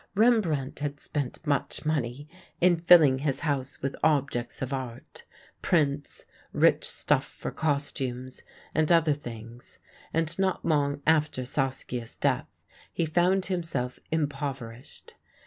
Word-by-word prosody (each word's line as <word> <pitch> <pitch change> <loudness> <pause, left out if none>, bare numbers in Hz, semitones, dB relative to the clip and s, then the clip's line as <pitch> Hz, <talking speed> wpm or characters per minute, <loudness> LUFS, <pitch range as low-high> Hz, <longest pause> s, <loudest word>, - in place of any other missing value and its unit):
Rembrandt 195 - +2
had 145 -1 -3
spent 145 +1 -4
much 145 0 -1
money 145 -2 -1 0.3
in 175 -1 +4
filling 165 -6 +6
his 140 -1 -1
house 140 -4 -2
with 135 - -1
objects 140 -6 +1
of 130 +1 -3
art, 125 -3 -7 0.4
prints, 145 -4 0 0.3
rich - - +3
stuffs - - +2
for - - -6
costumes, 135 -4 -2 0.3
and 155 +1 +2
other 165 -3 +5
things 120 -3 -9 0.3
and 165 +2 +1
not 190 -1 0
long 145 -3 +1
after 150 -5 +2
Saskia's 130 -3 -2
death - - 0 0.4
he 170 - 0
found 180 +4 +2
himself 165 -9 -2
impoverished. 140 -5 -4
145 Hz, 120 wpm, -28 LUFS, 130-160 Hz, 0.4 s, filling